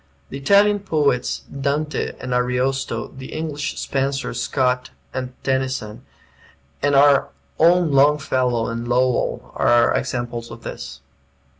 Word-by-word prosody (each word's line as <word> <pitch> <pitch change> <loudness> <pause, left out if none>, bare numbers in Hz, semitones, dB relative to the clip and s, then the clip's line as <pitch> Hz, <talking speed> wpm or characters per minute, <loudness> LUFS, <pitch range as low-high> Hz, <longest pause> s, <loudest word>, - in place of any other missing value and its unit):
The - - -6
Italian 205 +7 +4
poets, 150 -9 0
Dante 140 +2 -2
and 125 - -4
Ariosto, 125 +2 -1
the 130 0 -9
English, 150 -2 -4
Spenser, 135 0 -2
Scott, 125 -2 0 0.2
and 130 -1 -4
Tennyson, 130 -5 -2 0.8
and 145 0 +2
our 140 0 +5 0.3
own 170 0 +4
Longfellow 135 -4 +2
and 115 +1 -4
Lowell, 125 0 0
are 120 0 +3
examples 120 -2 -3
of - - -11
this. 70 0 -7
135 Hz, 115 wpm, -21 LUFS, 125-145 Hz, 0.8 s, our